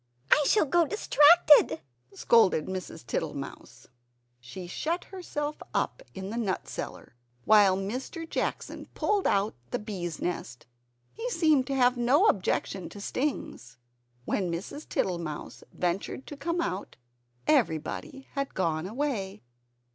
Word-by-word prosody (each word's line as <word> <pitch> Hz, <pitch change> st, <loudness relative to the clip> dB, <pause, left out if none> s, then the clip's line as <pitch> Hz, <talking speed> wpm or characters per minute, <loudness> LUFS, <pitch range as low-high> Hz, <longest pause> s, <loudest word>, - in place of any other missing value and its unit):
"I 295 Hz, -, +6 dB
shall 420 Hz, -, +4 dB
go 335 Hz, +3 st, +3 dB
distracted!" 295 Hz, -, +6 dB, 0.3 s
scolded 195 Hz, -5 st, +4 dB
Mrs. 185 Hz, -9 st, -6 dB
Tittlemouse. 140 Hz, 0 st, -5 dB, 0.5 s
She 125 Hz, +10 st, -9 dB
shut 320 Hz, -, -2 dB
herself 300 Hz, -6 st, -5 dB
up -, -, 0 dB
in 190 Hz, +1 st, -5 dB
the 230 Hz, -, -4 dB
nut 205 Hz, -6 st, -2 dB
cellar -, -, -7 dB, 0.3 s
while 205 Hz, -3 st, +6 dB
Mr. 255 Hz, -, -4 dB
Jackson -, -, -3 dB
pulled 410 Hz, -2 st, +1 dB
out 200 Hz, +2 st, +2 dB, 0.2 s
the -, -, -1 dB
bees 185 Hz, -6 st, -5 dB
nest. 125 Hz, -8 st, -4 dB, 0.5 s
He 460 Hz, +3 st, -4 dB
seemed 310 Hz, -, +3 dB
to 275 Hz, -, -1 dB
have 250 Hz, -1 st, +4 dB
no 260 Hz, -, +4 dB
objection 190 Hz, -, 0 dB
to 205 Hz, -, -10 dB
stings. 200 Hz, -, -3 dB, 0.5 s
When 185 Hz, -4 st, -1 dB
Mrs. 195 Hz, -, -6 dB
Tittlemouse 170 Hz, -5 st, -3 dB
ventured 180 Hz, +8 st, -2 dB
to 290 Hz, -, -8 dB
come 340 Hz, +4 st, -1 dB
out 190 Hz, -, -4 dB, 0.5 s
everybody 265 Hz, -, 0 dB
had 275 Hz, -1 st, -3 dB
gone 165 Hz, -2 st, 0 dB
away. 215 Hz, -, -3 dB
215 Hz, 125 wpm, -28 LUFS, 180-295 Hz, 0.5 s, I